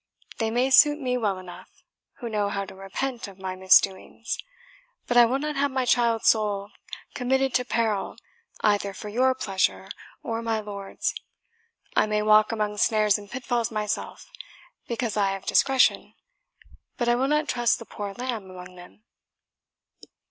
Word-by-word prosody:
They 225 -1 0
may 250 +4 +1
suit 295 +2 +6
me 250 -3 -1
well 210 -6 0
enough, 185 -1 -11 0.5
who 240 - -4
know 210 -2 -1
how 200 -1 -3
to - - -11
repent 230 +6 -4
of 195 -2 -13
my 190 -1 -5
misdoings; 190 +4 +2 0.7
but 245 - -2
I 240 -1 +8
will 250 +3 0
not 300 +1 -3
have 285 +1 +2
my 260 -1 -1
child's 235 -2 +3
soul 205 -2 0 0.4
committed 265 +1 0
to 250 - +1
peril 225 -4 -1 0.4
either 200 -2 +1
for 210 - -7
your 255 +4 +2
pleasure 195 -4 -1 0.3
or 225 0 -3
my 225 -1 -1
lord's. 200 -2 -4 0.8
I - - +3
may 210 0 0
walk 215 +1 +5
among 210 -2 -2
snares 210 -1 +3
and 205 -1 -13
pitfalls 245 -2 -2
myself, 215 -1 -4 0.6
because 235 -2 -3
I 195 -2 +2
have 195 - -7
discretion, 270 -2 +2 0.8
but 240 - -1
I 240 - +4
will 255 +3 +1
not 300 +1 +1
trust 240 -3 +1
the 230 - -10
poor 205 -2 -6
lamb 240 -6 -4
among 180 0 -11
them." 180 +4 -15
220 Hz, 160 wpm, -25 LUFS, 200-250 Hz, 0.8 s, I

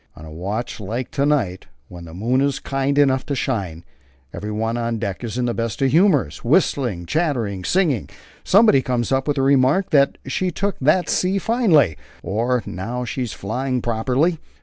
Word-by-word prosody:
On 75 - -11
a 80 - -10
watch 100 +11 -4
like 115 +5 -4
to 140 +1 0
night, 115 -12 0 0.2
when 85 -1 -10
the 80 - -11
moon 120 +7 +1
is 140 0 +1
kind 135 +1 -2
enough 135 -2 +3
to 140 - -1
shine, 95 -11 -3 0.5
everyone 110 +2 -3
on 115 -1 -2
deck 100 0 -4
is 120 0 -4
in 125 - 0
the 120 - 0
best 115 -1 -3
of 135 - +2
humours, 150 - +2
whistling, 110 -11 +1
chattering, 125 - -1
and 90 - -8
singing. 165 - +1 0.3
Somebody 200 -8 +5
comes 125 -2 -2
up 135 +1 +1
with 145 - +1
the 135 - 0
remark 140 +7 +3
that 140 -2 +3
'She 160 +8 -1
took 195 +4 -2
that 155 +7 +2
sea 185 +2 +1
finely,' 195 - +3 0.3
or 120 +4 0
'Now 120 +7 -4
she's 120 0 -4
flying 125 +5 -2
properly.' 125 +9 0
125 Hz, 180 wpm, -21 LUFS, 110-145 Hz, 0.5 s, Somebody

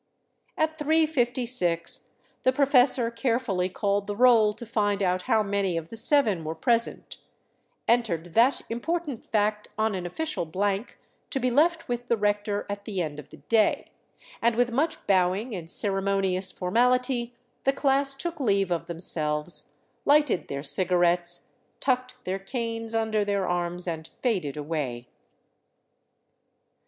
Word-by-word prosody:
At 315 0 0
3:56 250 - 0 0.3
the 255 - +3
professor 255 -3 +4
carefully 230 -6 0
called 200 +1 -1
the 205 - -3
roll 230 -2 +5
to 225 +3 -9
find 205 -3 0
out 185 0 +1
how 220 -3 +4
many 200 -3 0
of 165 0 -5
the - - -8
seven 225 - +2
were 160 +1 -4
present, 230 +8 0 0.7
entered 175 -9 +1
that 240 +5 +4
important 290 +2 -3
fact 210 -1 0
on 220 0 +1
an 180 -2 -3
official 310 - -2
blank 200 +6 -2 0.3
to 270 - -1
be 255 0 +1
left 330 +5 +2
with 245 0 -3
the 235 - +2
rector 205 0 0
at 205 0 -5
the 200 -4 -3
end 150 -3 -3
of 150 - -11
the - - -13
day, 220 -2 +1 0.5
and 235 -1 +3
with 245 +1 +2
much 305 +7 -1
bowing 195 +4 +1
and 170 -4 -6
ceremonious 195 -1 0
formality 245 +5 +1 0.3
the 270 - +4
class 275 0 +1
took 335 +3 -5
leave 200 -7 +1
of 170 - -1
themselves, 150 -2 -2 0.3
lighted 290 - +3
their 140 0 -4
cigarettes, 175 0 +1 0.3
tucked 255 -1 0
their 190 +1 -2
canes 230 +1 -4
under 220 -2 +1
their 200 -2 -1
arms, 175 0 -2
and 160 -2 -4
faded 180 - 0
away. 145 -6 -3
210 Hz, 140 wpm, -26 LUFS, 180-250 Hz, 0.7 s, roll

